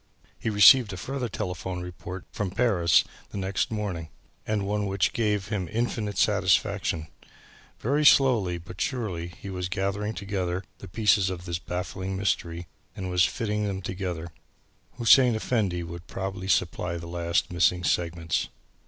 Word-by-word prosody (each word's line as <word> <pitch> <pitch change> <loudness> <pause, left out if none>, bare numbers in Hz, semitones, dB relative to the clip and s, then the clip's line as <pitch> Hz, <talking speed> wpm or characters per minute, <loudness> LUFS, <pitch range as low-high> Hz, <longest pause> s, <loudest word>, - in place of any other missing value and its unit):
He - - -2
received 105 +2 +7
a - - -5
further 130 +5 -3
telephone 90 -3 -4
report 90 +1 -8
from 105 -2 -2
Paris 90 -6 +3 0.3
the - - -7
next 95 0 -1
morning 100 -7 -3 0.4
and 105 -2 0
one 105 0 -1
which 95 -1 +1
gave 105 -3 0
him 100 -5 -2
infinite 110 -3 -2
satisfaction. 80 -1 +2 0.7
Very 145 +6 +1
slowly 120 -11 +5
but 90 +2 -9
surely 105 -10 -2
he 95 +3 -9
was 90 -1 -3
gathering 100 +3 -2
together 95 -2 -2 0.2
the 100 - -9
pieces 105 -1 +3
of 90 -1 -6
this 85 -1 -3
baffling 95 +2 -4
mystery 85 -3 -1 0.3
and 95 -1 -4
was 90 0 +4
fitting 105 -3 -1
them 95 -1 -4
together. 90 -3 -4 0.6
Hussein 120 0 +5
Effendi 105 -6 0
would 85 0 -8
probably 95 -1 -5
supply 85 -1 0
the 85 - -7
last 85 0 -1
missing 90 +1 +3
segments. 85 -1 0
95 Hz, 145 wpm, -27 LUFS, 90-105 Hz, 0.7 s, received